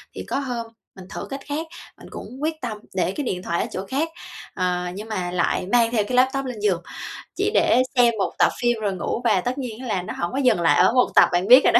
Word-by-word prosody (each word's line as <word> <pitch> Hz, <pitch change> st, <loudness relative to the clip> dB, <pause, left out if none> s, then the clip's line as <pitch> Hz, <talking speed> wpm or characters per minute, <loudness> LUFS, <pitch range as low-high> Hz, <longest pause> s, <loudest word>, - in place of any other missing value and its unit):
Thì -, -, -5 dB
có -, -, -1 dB
hôm 245 Hz, -4 st, -4 dB, 0.3 s
mình 190 Hz, -1 st, -11 dB
thử -, -, -6 dB
cách 275 Hz, 0 st, -5 dB
khác 310 Hz, +3 st, -3 dB, 0.3 s
mình -, -, -13 dB
cũng -, -, -7 dB, 0.2 s
quyết 315 Hz, -1 st, -2 dB
tâm 225 Hz, -4 st, -4 dB, 0.2 s
để 185 Hz, 0 st, +1 dB
cái 295 Hz, -, -2 dB
điện 180 Hz, -4 st, -3 dB
thoại 170 Hz, -, -1 dB
ở -, -, -2 dB
chỗ 190 Hz, +1 st, -4 dB
khác, 290 Hz, +9 st, -1 dB, 0.4 s
ờ, 180 Hz, -1 st, -1 dB
nhưng 210 Hz, +3 st, -7 dB
mà 180 Hz, -4 st, -2 dB
lại 180 Hz, +1 st, 0 dB
mang 235 Hz, -1 st, +4 dB
theo 215 Hz, -4 st, +2 dB
cái 250 Hz, -, -1 dB
laptop 265 Hz, +1 st, +3 dB
lên 245 Hz, -4 st, -5 dB
giường 190 Hz, -5 st, +1 dB, 0.5 s
chỉ 405 Hz, +2 st, 0 dB
để 255 Hz, -, +4 dB
xem 240 Hz, -1 st, +5 dB
1 190 Hz, -, 0 dB
tập -, -, +6 dB
phim 240 Hz, -2 st, +2 dB
rồi 200 Hz, -2 st, 0 dB
ngủ, 190 Hz, +6 st, -3 dB
và 235 Hz, -, +3 dB
tất 250 Hz, +2 st, -2 dB
nhiên 245 Hz, -4 st, -5 dB
á 260 Hz, -, -7 dB
là 190 Hz, -5 st, 0 dB
nó -, -, -6 dB
hổng 175 Hz, -, -2 dB
có 265 Hz, -, -4 dB
dừng 250 Hz, -10 st, +3 dB
lại 165 Hz, -, +4 dB
ở -, -, +5 dB
1 250 Hz, -, +4 dB
tập, -, -, +7 dB
bạn 175 Hz, +2 st, +1 dB
biết 255 Hz, +2 st, +9 dB
rồi -, -, +5 dB
đó. -, -, +8 dB
235 Hz, 270 wpm, -23 LUFS, 185-260 Hz, 0.5 s, biết